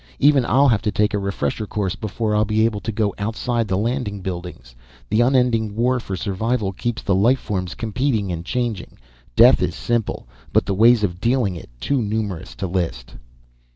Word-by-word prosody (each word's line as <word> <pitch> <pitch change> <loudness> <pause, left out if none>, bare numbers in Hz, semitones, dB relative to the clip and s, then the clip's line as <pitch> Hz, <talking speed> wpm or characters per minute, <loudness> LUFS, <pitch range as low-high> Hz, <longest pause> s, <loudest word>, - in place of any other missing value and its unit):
Even 145 -2 +4
I'll 140 +4 +4
have 110 -4 +2
to 110 -2 -1
take 105 +2 +1
a 105 - +1
refresher 100 0 -2
course 100 -3 -2
before 110 0 -2
I'll 105 - +3
be 110 0 +2
able 110 -3 -1
to 115 - -4
go 105 -1 0
outside 115 +2 -1
the 95 -1 0
landing 110 -2 -2
buildings. 90 -9 -7 0.4
The 110 +2 +3
unending 120 -4 +2
war 125 +2 +1
for 95 -5 -5
survival 100 +3 -1
keeps 120 +3 -3
the 100 - +1
life 115 +8 +4
forms 95 -7 -4
competing 110 -2 -1
and 85 -1 -4
changing. 115 -2 -3 0.4
Death - - +7
is - - -1
simple, 120 - -2 0.2
but - - +3
the 100 - -1
ways 115 +3 +5
of 90 -3 -2
dealing 120 -6 +1
it 85 - -10
too 135 - 0
numerous 105 - -3
to 95 - -4
list." 85 -10 -3
105 Hz, 190 wpm, -21 LUFS, 95-120 Hz, 0.4 s, Death